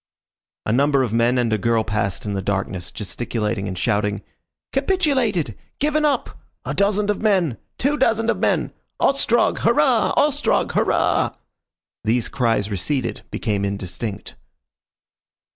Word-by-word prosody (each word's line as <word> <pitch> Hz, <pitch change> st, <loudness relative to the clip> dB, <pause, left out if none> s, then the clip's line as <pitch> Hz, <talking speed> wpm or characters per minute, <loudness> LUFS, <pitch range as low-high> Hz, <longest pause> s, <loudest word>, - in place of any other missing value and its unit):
A 110 Hz, -, +1 dB
number 140 Hz, +1 st, +3 dB
of 115 Hz, -4 st, -2 dB
men 120 Hz, +2 st, +3 dB
and 120 Hz, -3 st, +1 dB
a 110 Hz, -, +1 dB
girl 115 Hz, +2 st, +2 dB
passed 105 Hz, -2 st, -2 dB
in 105 Hz, -, -2 dB
the 100 Hz, -, -2 dB
darkness, 95 Hz, -2 st, -2 dB
gesticulating 105 Hz, 0 st, -3 dB
and 95 Hz, -1 st, -5 dB
shouting: 105 Hz, +2 st, 0 dB, 0.5 s
"Capitulated! 265 Hz, -, +1 dB, 0.2 s
Given 300 Hz, +1 st, +1 dB
up!" 290 Hz, -, -1 dB, 0.3 s
"A -, -, -2 dB
dozand 205 Hz, +1 st, +2 dB
of 205 Hz, -, -4 dB
men." 185 Hz, -, +2 dB, 0.2 s
"Two 290 Hz, +3 st, 0 dB
dozand 225 Hz, -2 st, +2 dB
of -, -, -3 dB
men." -, -, +1 dB, 0.3 s
"Ostrog, 270 Hz, -4 st, +2 dB
Hurrah! -, -, +3 dB
Ostrog, 290 Hz, 0 st, +2 dB
Hurrah!" -, -, +1 dB, 0.7 s
These 115 Hz, +2 st, +1 dB
cries 115 Hz, -5 st, 0 dB
receded, 120 Hz, +6 st, -2 dB
became 105 Hz, -2 st, -2 dB
indistinct. 100 Hz, +1 st, -4 dB
120 Hz, 130 wpm, -21 LUFS, -, 0.7 s, number